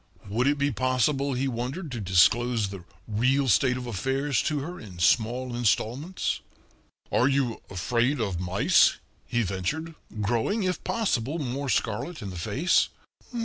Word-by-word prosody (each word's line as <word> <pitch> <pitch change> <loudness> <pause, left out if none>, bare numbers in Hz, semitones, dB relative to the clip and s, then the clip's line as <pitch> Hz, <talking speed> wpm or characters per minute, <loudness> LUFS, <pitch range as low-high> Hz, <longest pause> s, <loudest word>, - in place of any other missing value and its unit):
Would 115 +6 +1
it 145 +1 +3
be 140 +1 +1
possible, 135 +2 +1
he 130 +2 0
wondered 130 +7 -4
to 120 - -4
disclose 105 +4 +3
the 95 -3 -8 0.2
real 130 +6 +2
state 125 +4 +3
of 125 - -5
affairs 130 +4 0
to 155 - -1
her 175 +5 -6
in 95 -5 -11
small 120 +8 +2
installments? 120 - 0 0.7
"Are 125 - +3
you 135 -4 0
afraid 120 - 0
of 100 -6 -1
mice?" 90 +2 +3 0.3
he 120 -1 +1
ventured, 110 - -3 0.3
growing, 120 - 0
if 180 -2 -1
possible, 155 - 0
more 140 -1 -3
scarlet 120 +7 -1
in 100 - -5
the - - -8
face. 135 - +2
125 Hz, 145 wpm, -27 LUFS, 110-140 Hz, 0.7 s, it